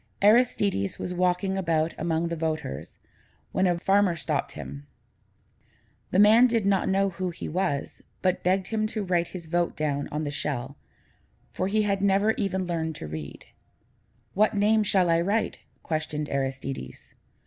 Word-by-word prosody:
Aristides 205 Hz, -, +3 dB
was 180 Hz, -, -4 dB
walking 180 Hz, +2 st, +1 dB
about 165 Hz, -3 st, 0 dB
among 165 Hz, 0 st, -1 dB
the 170 Hz, -, -2 dB
voters, 155 Hz, -, -4 dB, 0.5 s
when 190 Hz, 0 st, +2 dB
a 175 Hz, -1 st, +1 dB
farmer 195 Hz, 0 st, +3 dB
stopped -, -, -2 dB
him. 70 Hz, +2 st, -8 dB, 1.2 s
The -, -, 0 dB
man 220 Hz, +5 st, +7 dB
did 230 Hz, -4 st, 0 dB
not 195 Hz, -1 st, +2 dB
know 195 Hz, 0 st, +2 dB
who 185 Hz, +1 st, -3 dB
he 175 Hz, -, -7 dB
was, 150 Hz, -5 st, -2 dB, 0.2 s
but 185 Hz, -1 st, +1 dB
begged 185 Hz, +1 st, +1 dB
him 215 Hz, -1 st, 0 dB
to 215 Hz, -1 st, -3 dB
write 175 Hz, -2 st, +1 dB
his 180 Hz, -3 st, -8 dB
vote 175 Hz, +1 st, 0 dB
down 145 Hz, -2 st, -1 dB
on 150 Hz, +1 st, -2 dB
the 145 Hz, -, -3 dB
shell, 140 Hz, -2 st, -3 dB, 0.8 s
for 185 Hz, -, -2 dB
he 215 Hz, +2 st, +2 dB
had 200 Hz, -1 st, 0 dB
never 200 Hz, +2 st, +3 dB
even 190 Hz, -4 st, -1 dB
learned 160 Hz, -2 st, -2 dB
to -, -, -6 dB
read. 75 Hz, -2 st, -7 dB, 0.9 s
"What 215 Hz, +1 st, +2 dB
name 215 Hz, +2 st, +4 dB
shall 190 Hz, -3 st, +3 dB
I 165 Hz, 0 st, +3 dB
write?" 205 Hz, +6 st, 0 dB, 0.2 s
questioned 155 Hz, -2 st, -3 dB
Aristides. 135 Hz, -, -4 dB
180 Hz, 160 wpm, -26 LUFS, 155-195 Hz, 1.2 s, man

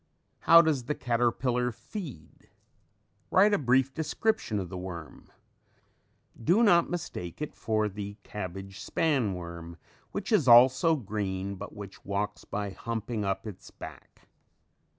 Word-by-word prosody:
How 165 Hz, 0 st, +8 dB
does 145 Hz, -6 st, 0 dB
the 150 Hz, -, -1 dB
caterpillar 125 Hz, +1 st, 0 dB
feed? 125 Hz, -, -9 dB, 0.8 s
Write 205 Hz, +3 st, +5 dB
a -, -, +3 dB
brief 130 Hz, 0 st, +2 dB
description 160 Hz, -, -1 dB
of 95 Hz, -3 st, -3 dB
the 95 Hz, -, -6 dB
worm. 85 Hz, -5 st, -8 dB, 1.1 s
Do 190 Hz, -, +4 dB
not 175 Hz, -6 st, +5 dB
mistake 165 Hz, -, -5 dB
it 150 Hz, -, -4 dB
for 110 Hz, -1 st, 0 dB
the 100 Hz, 0 st, -6 dB
cabbage 95 Hz, -1 st, -7 dB
span 135 Hz, -, 0 dB
worm 85 Hz, -1 st, -8 dB, 0.3 s
which 200 Hz, +1 st, -4 dB
is 175 Hz, -, +3 dB
also 130 Hz, +7 st, +7 dB
green, 100 Hz, -5 st, -3 dB
but 100 Hz, +2 st, -8 dB
which 100 Hz, -2 st, -10 dB
walks 100 Hz, +1 st, -3 dB
by 100 Hz, -1 st, -3 dB
humping 115 Hz, +2 st, -4 dB
up 95 Hz, +1 st, -2 dB
its 105 Hz, -4 st, -9 dB
back. -, -, -12 dB
110 Hz, 130 wpm, -29 LUFS, 95-150 Hz, 1.1 s, How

